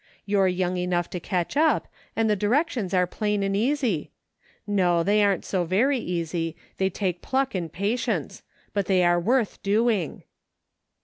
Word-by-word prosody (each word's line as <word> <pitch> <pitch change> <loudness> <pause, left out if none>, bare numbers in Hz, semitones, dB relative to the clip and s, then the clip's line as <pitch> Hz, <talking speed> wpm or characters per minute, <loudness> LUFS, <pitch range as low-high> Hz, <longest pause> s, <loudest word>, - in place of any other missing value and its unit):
You're 200 -2 +3
young 180 0 0
enough 180 -1 -1
to 180 - -3
catch 175 +3 -2
up, 315 +2 +3 0.3
and 225 0 +2
the 210 - +3
directions 230 - 0
are 180 -1 +3
plain 210 +2 -1
and 195 0 0
easy; 235 - 0 0.6
no, 180 -5 +2
they 205 +3 +3
aren't 200 -3 +1
so 185 -2 0
very 235 +11 +2
easy, 165 -3 -2 0.2
they 190 0 +1
take 180 -2 -2
pluck 270 0 0
and 175 -4 -3
patience; 210 +6 -2 0.3
but 200 -2 -1
they 185 -2 +3
are 175 0 +4
worth 230 +4 0
doing." 210 -4 +1
195 Hz, 160 wpm, -25 LUFS, 180-220 Hz, 0.6 s, are